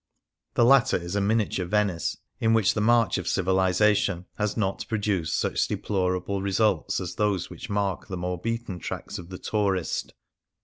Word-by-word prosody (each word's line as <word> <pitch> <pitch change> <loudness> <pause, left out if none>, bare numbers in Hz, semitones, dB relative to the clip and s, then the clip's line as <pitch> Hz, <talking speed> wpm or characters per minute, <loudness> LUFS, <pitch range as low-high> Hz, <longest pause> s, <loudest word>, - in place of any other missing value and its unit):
The 120 - +5
latter 130 -1 +5
is 85 +2 -5
a 100 - +2
miniature 100 -3 0
Venice, 90 -4 0 0.2
in 115 0 +3
which 110 -4 +3
the 105 - -1
march 115 -2 +3
of 90 - -6
civilization 95 +1 +2
has 105 +1 -1
not 100 -2 -1
produced 100 -7 0
such - - 0
deplorable 95 0 -1
results 100 -3 +1
as 90 -2 -4
those 100 -3 0
which - - -8
mark 100 -2 -1
the 95 -2 -5
more 90 0 -3
beaten 115 -4 -3
tracks - - -5
of 85 -1 -10
the 95 - -7
tourist. 100 -4 -1
100 Hz, 165 wpm, -26 LUFS, 90-105 Hz, 0.2 s, The